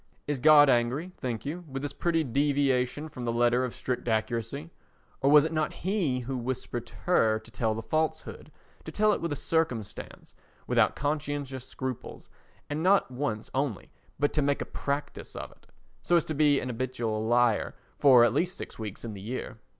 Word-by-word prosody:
Is 145 -2 -2
God 150 +1 +8
angry, 130 +8 +1
think 120 -2 -4
you, 170 +5 -4
with 135 0 -5
this 145 - -3
pretty 165 -2 +1
deviation 140 +1 +1
from 130 -5 -8
the 120 - 0
letter 120 +1 +3
of 125 - -4
strict 125 -1 -3
accuracy? 115 +7 -2 0.5
or 135 - +3
was 150 0 +7
it 160 - -2
not 155 -1 0
He 175 -11 +1
who 130 +2 -4
whispered 120 -1 -4
to - - -12
her 110 -11 +3
to 110 +1 -13
tell 110 -1 0
the 115 - -5
falsehood, 160 +6 -2 0.3
to - - -6
tell 215 0 +3
it - - -2
with 170 -1 -2
a - - 0
circumstance, 145 -7 -2 0.3
without - - +3
conscientious 145 -3 -3
scruples, 130 -2 -6 0.4
and 145 +2 -3
not 190 -5 +3
once 125 -4 -3
only 130 -7 -2 0.3
but 145 +1 +1
to 150 - +2
make 140 0 +1
a - - -12
practice 140 +1 -4
of - - -6
it, - - -23 0.3
so 175 - +2
as 170 - +3
to 155 - -3
be 145 -1 +4
an 125 - -4
habitual 115 -3 -2
liar 120 -1 +2 0.2
for 125 -4 +7
at - - +2
least 180 +2 0
six - - -8
weeks 105 0 -6
in 110 - -5
the 100 - -8
year? 115 +2 -5
135 Hz, 190 wpm, -28 LUFS, 120-150 Hz, 0.5 s, God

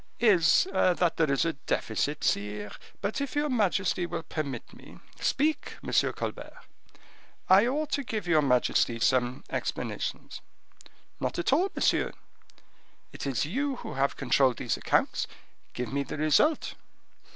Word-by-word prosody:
"Is 200 - +5
that 180 -1 +2
there 155 -3 +2
is 140 - +2
a 165 - 0
deficit, 145 +1 -2
sire; 105 0 -1 0.3
but 200 +7 -2
if 280 0 -4
your 295 +1 +1
majesty 195 -6 +1
will 165 - -4
permit 140 -6 -5
me—" - - -14 0.2
"Speak, 300 +2 0
M. - - -5 0.2
Colbert." - - -6 0.9
"I 195 +5 +6
ought 300 +4 -1
to 280 - 0
give 215 -6 -4
your 160 -3 +4
majesty 125 -3 +2
some 125 +1 +1
explanations." - - -4 0.8
"Not - - -2
at 175 +9 +1
all, 360 +7 +3
monsieur, - - +1 1.0
it - - -6
is 135 +1 0
you 270 - -1
who - - -7
have 135 +1 0
controlled 130 -1 +2
these - - -1
accounts; - - 0 0.5
give 125 +1 -4
me 140 - +1
the 140 - -5
result." 155 - +2
165 Hz, 140 wpm, -28 LUFS, -, 1.0 s, I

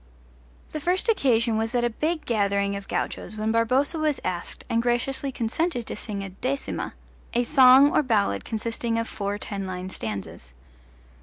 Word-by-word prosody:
The 310 - -3
first 360 +8 +1
occasion 235 - +2
was 225 +2 -2
at 240 - +2
a 240 - +2
big 310 +7 -2
gathering 200 -3 +1
of 200 0 -7
gauchos 215 - -3
when 215 +1 -1
Barboza 255 +8 +2
was 305 -2 +1
asked 180 -1 -4
and 230 - +1
graciously 245 +3 0
consented 245 +3 -1
to - - -5
sing 200 -3 -4
a 195 - -6
decima 255 +9 -3 0.4
a 240 - +3
song 265 +2 +7
or - - +5
ballad 205 - +1
consisting 230 +1 -2
of 230 0 -1
four 200 -1 -3
ten 200 -2 -4
line 185 0 -5
stanzas. 100 - -6
230 Hz, 165 wpm, -25 LUFS, 200-265 Hz, 0.4 s, song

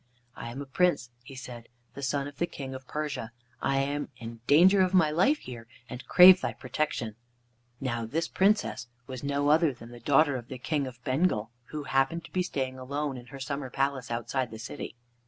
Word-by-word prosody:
"I 120 - -6
am 135 +4 -6
a - - -11
Prince," 140 -3 +1
he 135 +2 -11
said, 120 -3 -9 0.2
"the 140 - -8
son 140 +1 -1
of 145 - -11
the 170 - +1
King 135 -5 -7
of 130 0 -9
Persia. 150 -6 -4 0.3
I 135 - +1
am 140 +2 -1
in 115 0 -9
danger 185 +7 +6
of 185 0 +2
my 160 -5 +5
life 190 - +3
here, 120 - -9 0.2
and 125 -1 -8
crave 185 +1 +9
thy - - -2
protection." 120 -8 -3 0.6
Now 120 -4 -2
this 165 +7 -1
Princess 195 - +1 0.2
was 130 0 -7
no 140 +1 +1
other 155 0 +5
than 120 -2 -12
the 120 - -10
daughter 145 +2 +3
of 120 -1 -9
the 130 - -7
King 140 +2 -1
of 125 -1 -11
Bengal, 130 -6 +1
who 150 +1 -6
happened 135 +5 0
to - - -14
be 185 - +1
staying 130 -7 -3
alone 140 +2 -3
in 125 -1 -10
her 135 +3 -10
summer 135 0 -4
palace 135 -1 -1
outside 120 +2 -2
the 110 - -8
city. 110 - -7
135 Hz, 205 wpm, -28 LUFS, 125-150 Hz, 0.6 s, crave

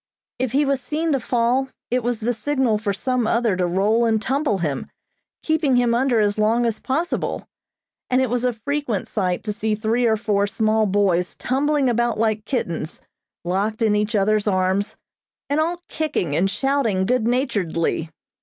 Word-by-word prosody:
If 255 -1 -1
he 290 +2 +3
was 275 -2 0
seen 320 +2 -1
to 275 - +2
fall, 245 +2 +1 0.2
it 250 +1 +2
was 240 -1 -2
the 240 +3 0
signal 245 -2 0
for 210 -2 -1
some 245 +3 -1
other 230 -3 +2
to 180 -1 0
roll 205 +6 +2
and 220 -1 +2
tumble 265 -1 0
him, 150 -7 -3 0.5
keeping 315 -4 +2
him 245 -1 +3
under 245 -1 +2
as 205 0 +1
long 225 +3 +2
as 225 -2 -1
possible, 315 +7 -2 0.6
and 255 - +3
it 260 - +2
was 245 0 0
a 250 - +2
frequent 245 -2 -3
sight 185 -4 -1
to 210 -1 -2
see 215 +1 -1
three 225 +3 +1
or 220 -1 +2
four 205 -2 +1
small 215 +1 +1
boys 185 -3 +1
tumbling 280 +2 +1
about 240 -1 +1
like 215 -1 0
kittens, 170 - -3 0.5
locked 205 +5 -1
in 215 -2 +3
each 210 +2 0
other's 210 +1 +2
arms, 190 +1 0 0.6
and 290 - +2
all 345 +2 -1
kicking 300 - -2
and 190 +5 +2
shouting 235 -6 0
good 245 0 +1
naturedly. 195 - 0
225 Hz, 175 wpm, -22 LUFS, 205-260 Hz, 0.6 s, he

